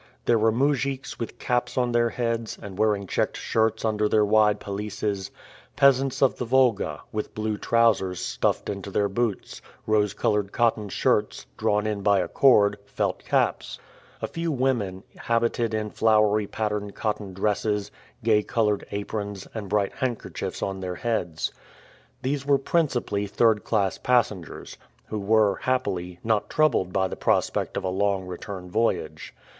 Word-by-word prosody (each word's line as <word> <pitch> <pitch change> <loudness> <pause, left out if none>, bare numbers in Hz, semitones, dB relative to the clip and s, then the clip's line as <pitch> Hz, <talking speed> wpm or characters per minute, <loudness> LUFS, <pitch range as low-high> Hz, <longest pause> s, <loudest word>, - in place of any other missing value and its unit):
There 115 -2 +3
were 110 +1 +4
mujiks 135 +2 -1
with 115 - -5
caps 125 +1 -1
on 125 -1 +2
their 120 0 +2
heads, 115 -2 -2
and 100 -2 -9
wearing 105 -1 +1
checked - - -1
shirts 110 0 0
under 105 -1 +1
their 105 0 +4
wide 105 0 +4
pelisses; 100 -1 -3 0.5
peasants 135 -1 +3
of 135 - +3
the 125 - -3
Volga, 115 - +2
with 105 0 -4
blue 110 0 -1
trousers 105 -5 +2
stuffed - - -1
into 100 -1 -4
their 100 +1 +1
boots, 110 +1 -2 0.2
rose 105 -2 +2
colored 105 -2 0
cotton 110 -3 +1
shirts, - - 0
drawn 105 0 +1
in 105 -2 -2
by 100 0 +4
a 90 - 0
cord, 105 -6 +4
felt - - -2
caps; - - 0 0.5
a - - 0
few 165 0 -3
women, 120 -9 -1
habited 115 0 0
in 110 -1 -2
flowery 110 -2 +3
patterned 105 -2 -3
cotton 105 -3 -3
dresses, 105 +1 -1 0.3
gay 110 -2 +4
colored 105 -2 0
aprons, 100 -1 -4
and 105 -4 -6
bright 100 -1 +1
handkerchiefs 125 -4 -4
on 95 -1 -3
their 90 -1 -4
heads. 90 -9 -2 0.7
These 135 +1 -1
were 140 0 +3
principally 130 -9 0
third 110 +1 +2
class 100 -4 0
passengers, 110 -9 -1 0.3
who 110 - -3
were, 105 -1 +3
happily, 95 -9 -2
not 110 -2 0
troubled 155 -12 +2
by 95 0 +1
the - - -6
prospect - - 0
of 100 - -2
a 95 - -1
long 95 0 0
return 90 +1 -7
voyage. 80 -8 -1
105 Hz, 150 wpm, -25 LUFS, 100-115 Hz, 0.7 s, were